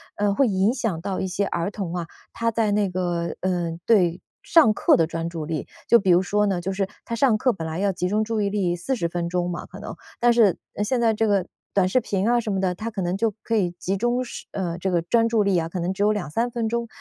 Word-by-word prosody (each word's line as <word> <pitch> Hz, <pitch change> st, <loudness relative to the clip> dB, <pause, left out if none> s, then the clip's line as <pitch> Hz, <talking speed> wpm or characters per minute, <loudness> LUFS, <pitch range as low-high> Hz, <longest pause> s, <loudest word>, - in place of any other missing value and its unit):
呃， 205 Hz, 0 st, +1 dB
会 265 Hz, +6 st, +3 dB
影 195 Hz, +2 st, +2 dB
响 225 Hz, -10 st, -2 dB
到 190 Hz, +1 st, -3 dB
一 190 Hz, -, -1 dB
些 195 Hz, +2 st, -1 dB
儿 170 Hz, 0 st, -2 dB
童 195 Hz, -5 st, -5 dB
啊， 175 Hz, -2 st, -3 dB, 0.3 s
他 230 Hz, 0 st, 0 dB
在 220 Hz, -2 st, +1 dB
那 205 Hz, -2 st, +1 dB
个 175 Hz, -2 st, -2 dB
呃， 175 Hz, -3 st, -1 dB
对 180 Hz, -6 st, +3 dB, 0.2 s
上 310 Hz, -10 st, +5 dB
课 -, -, +4 dB
的 165 Hz, -, +3 dB
专 165 Hz, +1 st, -4 dB
注 165 Hz, -3 st, -5 dB
力。 155 Hz, -2 st, -4 dB, 0.2 s
就 235 Hz, -, +6 dB
比 195 Hz, -, -1 dB
如 180 Hz, +1 st, +5 dB
说 210 Hz, +2 st, +1 dB
呢， 190 Hz, -3 st, 0 dB
就 190 Hz, +3 st, -3 dB
是 195 Hz, 0 st, -1 dB, 0.2 s
他 235 Hz, -, -3 dB
上 235 Hz, -2 st, +3 dB
课 250 Hz, +2 st, +2 dB
本 160 Hz, -4 st, -5 dB
来 160 Hz, +1 st, -4 dB
要 200 Hz, +1 st, +1 dB
集 180 Hz, -1 st, -2 dB
中 210 Hz, +3 st, +1 dB
注 220 Hz, 0 st, -1 dB
意 200 Hz, -, +1 dB
力 190 Hz, -4 st, 0 dB
40 180 Hz, +1 st, -2 dB
分 170 Hz, 0 st, -3 dB
钟 175 Hz, 0 st, -1 dB
嘛 175 Hz, -, -6 dB
可 -, -, -11 dB
能， -, -, -7 dB, 0.2 s
但 240 Hz, 0 st, +4 dB
是 220 Hz, -6 st, +4 dB, 0.3 s
现 245 Hz, +4 st, 0 dB
在 225 Hz, -1 st, +3 dB
这 220 Hz, +1 st, +1 dB
个 195 Hz, -3 st, +2 dB, 0.3 s
短 190 Hz, -2 st, +3 dB
视 255 Hz, +7 st, +3 dB
频 200 Hz, -1 st, -1 dB
啊 240 Hz, 0 st, +4 dB
什 220 Hz, -2 st, -3 dB
么 195 Hz, -, 0 dB
的， 185 Hz, -1 st, +1 dB
他 220 Hz, +5 st, -4 dB
可 210 Hz, -3 st, -4 dB
能 175 Hz, +1 st, -1 dB
就 220 Hz, +2 st, +1 dB
可 230 Hz, -, -1 dB
以 185 Hz, -5 st, +1 dB
集 195 Hz, +2 st, -1 dB
中 240 Hz, +4 st, 0 dB
时 -, -, -8 dB
呃， 175 Hz, -3 st, -3 dB
这 190 Hz, -, -1 dB
个 175 Hz, -1 st, +2 dB
专 230 Hz, +6 st, +2 dB
注 225 Hz, -2 st, +3 dB
力 200 Hz, -2 st, +2 dB
啊， 165 Hz, -1 st, -1 dB
可 180 Hz, -, -4 dB
能 175 Hz, +2 st, -1 dB
只 195 Hz, -, -5 dB
有 210 Hz, -, +4 dB
2-3 210 Hz, +4 st, -1 dB
分 230 Hz, -1 st, -1 dB
钟。 235 Hz, +1 st, -2 dB
195 Hz, 280 characters per minute, -24 LUFS, 175-225 Hz, 0.3 s, 就